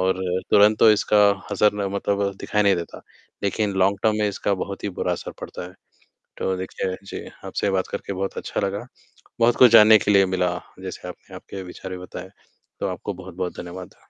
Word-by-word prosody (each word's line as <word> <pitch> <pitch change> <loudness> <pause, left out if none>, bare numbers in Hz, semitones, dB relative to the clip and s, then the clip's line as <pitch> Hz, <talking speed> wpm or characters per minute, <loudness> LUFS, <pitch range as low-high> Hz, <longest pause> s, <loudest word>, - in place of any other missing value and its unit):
और 95 0 +2 0.4
तुरंत 105 +1 +6
तो 110 - +7
इसका 105 0 +2 0.4
असर 105 +1 +3
ना 105 -1 -2
मतलब 100 0 -1
दिखाई 105 0 +1
नहीं 100 -2 +4
देता, 85 - -6 0.4
लेकिन 100 0 0
लॉन्ग 100 +1 +3
टर्म 110 -1 +3
में 105 -1 +2
इसका 100 0 -1
बहुत 100 +2 -6
ही - - 0
बुरा - - 0
असर - - -5
पड़ता - - -7
है, 90 - -16 0.6
तो 95 0 -1
देखिए 95 0 -4
जी - - -7 0.2
आपसे 100 - -1
बात 95 -1 0
करके 100 - -4
बहुत 95 +1 -3
अच्छा - - -3
लगा, 100 +5 -4 0.5
बहुत 115 +1 +4
कुछ 125 -3 +8
जानने 110 -1 +9
के 105 - +1
लिए 100 -1 +6
मिला, 90 -1 0 0.2
जैसे - - -7
आपने - - -12
आपके 95 -1 -8
विचार 95 +1 -9
भी 90 - -4
बताए, 90 - -8 0.5
तो - - -1
आपको - - -5
बहुत-बहुत 90 -1 -6
धन्यवाद। 90 0 -8
100 Hz, 195 wpm, -23 LUFS, 95-105 Hz, 0.6 s, जानने